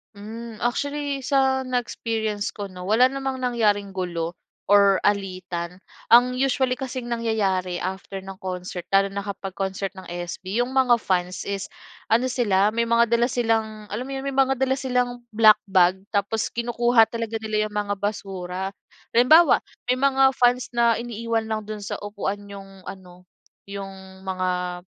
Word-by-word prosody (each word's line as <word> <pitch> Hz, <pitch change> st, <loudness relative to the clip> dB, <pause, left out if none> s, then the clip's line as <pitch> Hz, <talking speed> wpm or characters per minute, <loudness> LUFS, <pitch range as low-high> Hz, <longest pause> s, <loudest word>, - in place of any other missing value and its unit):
Hmm, 225 Hz, +3 st, -8 dB
actually 285 Hz, +3 st, -1 dB
sa 265 Hz, -1 st, +1 dB
na-experience 225 Hz, -4 st, -2 dB
ko 200 Hz, -2 st, -6 dB
'no, 180 Hz, 0 st, -8 dB
wala 245 Hz, +5 st, +4 dB
namang 270 Hz, -1 st, -3 dB
nangyaring 210 Hz, -5 st, +1 dB
gulo 175 Hz, -3 st, -3 dB, 0.3 s
or 200 Hz, -1 st, +5 dB
alitan. 185 Hz, -3 st, -2 dB, 0.3 s
Ang 250 Hz, +2 st, +5 dB
usually 260 Hz, -1 st, +1 dB
kasing 255 Hz, -2 st, -5 dB
nangyayari, 200 Hz, -6 st, 0 dB
after 190 Hz, +1 st, -5 dB
ng 190 Hz, 0 st, -9 dB
concert, 180 Hz, -1 st, -5 dB
lalo 195 Hz, 0 st, +4 dB
na 200 Hz, -, -3 dB
kapag 200 Hz, -1 st, -6 dB
concert 190 Hz, 0 st, -3 dB
ng 190 Hz, -2 st, -12 dB
SB, 175 Hz, +5 st, -3 dB
yung 250 Hz, -, -6 dB
mga 260 Hz, -2 st, +4 dB
fans 180 Hz, -1 st, -1 dB
is 200 Hz, -1 st, -4 dB, 0.4 s
ano 250 Hz, +3 st, +2 dB
sila, 210 Hz, -5 st, +2 dB
may 235 Hz, +1 st, 0 dB
mga 235 Hz, 0 st, +3 dB
dala 235 Hz, +1 st, +3 dB
silang, 220 Hz, -3 st, -1 dB
alam 240 Hz, +5 st, -4 dB
mo -, -, -7 dB
yun, 270 Hz, -, -4 dB
may 275 Hz, -, -1 dB
mga 270 Hz, 0 st, +3 dB
dala 265 Hz, 0 st, +1 dB
silang 250 Hz, -2 st, 0 dB, 0.2 s
black 215 Hz, -1 st, +7 dB
bag 185 Hz, -1 st, +4 dB, 0.2 s
tapos 205 Hz, +2 st, 0 dB
kinukuha 240 Hz, 0 st, +3 dB
talaga 230 Hz, -1 st, -3 dB
nila 215 Hz, -1 st, -1 dB
yung 210 Hz, -, -13 dB
mga 205 Hz, -1 st, 0 dB
basura. 190 Hz, -2 st, -4 dB, 0.4 s
Halimbawa, 285 Hz, +7 st, +6 dB, 0.3 s
may 255 Hz, -, 0 dB
mga 270 Hz, 0 st, +4 dB
fans 245 Hz, 0 st, +2 dB
na 235 Hz, -1 st, +3 dB
iniiwan 230 Hz, -1 st, -2 dB
lang 220 Hz, -1 st, -2 dB
dun 215 Hz, -1 st, -6 dB
sa 200 Hz, -, -4 dB
upuan 205 Hz, -1 st, -3 dB
yung 195 Hz, -1 st, -11 dB
ano, 180 Hz, -2 st, -11 dB, 0.4 s
yung 200 Hz, -1 st, -6 dB, 0.3 s
mga 180 Hz, -1 st, -2 dB
215 Hz, 155 wpm, -24 LUFS, 195-245 Hz, 0.4 s, black